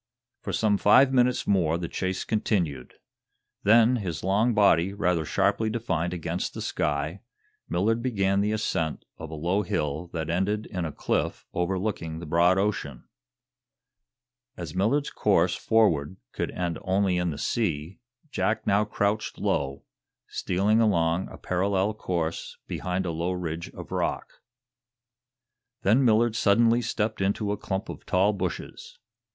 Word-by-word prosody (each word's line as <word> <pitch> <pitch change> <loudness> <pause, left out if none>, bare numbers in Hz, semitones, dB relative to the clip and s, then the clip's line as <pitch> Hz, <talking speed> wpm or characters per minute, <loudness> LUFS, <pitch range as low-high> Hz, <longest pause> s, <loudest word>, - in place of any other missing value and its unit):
For - - -4
some 105 -2 +2
five 130 +6 +5
minutes 125 -1 +2
more 85 -5 +2
the 85 -1 -4
chase 95 +2 -2
continued. 90 - -1 0.7
Then, 115 +4 +5
his 85 -9 -4
long 105 +5 +2
body 100 -3 +4
rather 90 -5 0
sharply 110 +7 +1
defined 95 -7 -1
against 85 0 -3
the - - -5
sky, 75 +5 -2 0.5
Millard 110 +7 +1
began 100 -5 +1
the 105 +1 +1
ascent 80 -7 -2
of 80 - -7
a 80 - -6
low 90 +6 0
hill 80 -2 -2
that 80 -2 -3
ended 100 +5 0
in 90 -4 -4
a 80 - -3
cliff - - -2
overlooking 90 -2 -2
the 85 - -7
broad 85 +4 +3
ocean. 95 -10 -2 1.5
As 85 -3 -6
Millard's 115 +10 +1
course - - +2
forward 95 -7 +2
could - - -3
end 85 -2 -3
only 95 -1 +1
in 90 0 0
the 75 - -4
sea, 85 -2 -2 0.3
Jack 110 +1 -1
now 100 +1 +3
crouched 105 0 -1
low, 70 -1 -1 0.4
stealing 100 +5 +1
along 85 -4 +1
a - - -10
parallel 95 +2 0
course 85 -5 -3
behind 90 +1 -3
a 85 - -1
low 85 +3 -2
ridge 85 -2 -4
of - - -9
rock. - - -3 1.4
Then 115 +8 +4
Millard 115 -1 +3
suddenly 115 +3 +4
stepped 110 -2 -2
into 100 +1 0
a - - 0
clump 95 +1 -3
of - - -9
tall 95 +3 +3
bushes. 100 - -5
95 Hz, 145 wpm, -26 LUFS, 85-105 Hz, 1.5 s, five